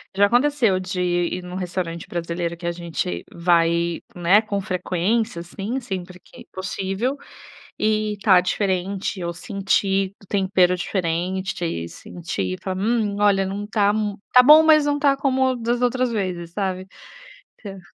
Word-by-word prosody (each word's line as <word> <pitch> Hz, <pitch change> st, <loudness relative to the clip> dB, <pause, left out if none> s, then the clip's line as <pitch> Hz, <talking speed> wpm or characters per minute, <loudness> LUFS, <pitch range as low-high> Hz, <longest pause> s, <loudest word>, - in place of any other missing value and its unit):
Já 200 Hz, +1 st, +5 dB
aconteceu 245 Hz, -5 st, +2 dB
de 185 Hz, 0 st, -4 dB
ir 175 Hz, 0 st, -1 dB
em -, -, -9 dB
um 180 Hz, -, -7 dB
restaurante 180 Hz, -2 st, -4 dB
brasileiro 170 Hz, 0 st, -3 dB
que 170 Hz, 0 st, -6 dB
a -, -, +1 dB
gente 170 Hz, -, -4 dB
vai, 170 Hz, 0 st, +2 dB, 0.2 s
né, 180 Hz, +5 st, +4 dB
com 200 Hz, -2 st, -2 dB
frequência, 185 Hz, +3 st, -1 dB
assim, 195 Hz, +9 st, -4 dB
sempre 185 Hz, -6 st, -6 dB
que -, -, -15 dB
possível 195 Hz, +7 st, -3 dB, 0.6 s
e 215 Hz, 0 st, +1 dB
está 195 Hz, -2 st, +4 dB
diferente, 190 Hz, +1 st, -2 dB
eu 170 Hz, -1 st, -3 dB
senti 195 Hz, 0 st, 0 dB
o -, -, -18 dB
tempero 190 Hz, -2 st, +2 dB
diferente 180 Hz, 0 st, -2 dB
e 85 Hz, -, -4 dB
senti 100 Hz, -, -5 dB
falar: 185 Hz, -1 st, -3 dB
"Hum, 215 Hz, -1 st, 0 dB
olha 200 Hz, -2 st, +3 dB
não 200 Hz, +2 st, -4 dB
tá 205 Hz, -1 st, +2 dB
mui 210 Hz, -1 st, -2 dB
tá 250 Hz, 0 st, +8 dB
bom, 305 Hz, +4 st, +9 dB
mas 305 Hz, -2 st, +5 dB
não 290 Hz, 0 st, +1 dB
está 280 Hz, -1 st, +2 dB
como 260 Hz, -2 st, +1 dB
das 240 Hz, +1 st, -1 dB
outras 250 Hz, 0 st, +1 dB
vezes" 180 Hz, -5 st, -3 dB
sabe. 190 Hz, -1 st, -3 dB, 0.7 s
Então 195 Hz, -2 st, -9 dB
190 Hz, 155 wpm, -22 LUFS, 175-215 Hz, 0.7 s, bom